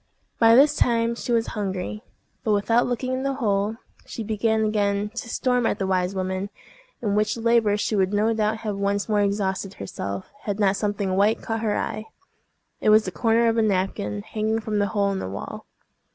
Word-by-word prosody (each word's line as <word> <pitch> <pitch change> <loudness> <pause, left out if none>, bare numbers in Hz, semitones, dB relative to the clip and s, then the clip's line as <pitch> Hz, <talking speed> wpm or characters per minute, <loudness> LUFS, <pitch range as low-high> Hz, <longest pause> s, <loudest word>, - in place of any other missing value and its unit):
By 230 0 +7
this 280 +4 +6
time 230 -1 +2
she 235 - -5
was 230 -1 +2
hungry; 200 0 -3 0.4
but 220 -4 +2
without 225 +4 +2
looking 250 +1 -2
in 255 - -1
the 275 0 -1
hole, 210 -4 0 0.3
she 225 - -6
began 220 +1 +1
again 205 -1 0
to 240 -1 -6
storm 250 0 +1
at - - 0
the 195 - -1
wise 185 0 0
woman, 190 +1 -2 0.5
in 205 -3 0
which 215 +2 +1
labor 230 -3 +3
she 210 +1 -1
would 190 -1 +2
no 215 +2 +2
doubt 220 0 0
have 205 -2 -2
once 200 0 0
more 210 -2 +2
exhausted 195 -1 -1
herself, 100 0 -6
had 205 0 -2
not 200 -1 +3
something 205 -2 -1
white 205 +3 +2
caught 225 0 -2
her 215 -2 0
eye: 215 0 -3 0.7
it - - +2
was 215 0 +6
the 185 - -3
corner 230 +4 +2
of 225 0 +2
a - - +4
napkin 185 - -1
hanging 220 +1 -1
from 215 -1 -2
the 205 - +2
hole 200 -1 +1
in 195 - -2
the - - -4
wall. 100 +1 -7
210 Hz, 200 wpm, -24 LUFS, 200-225 Hz, 0.7 s, By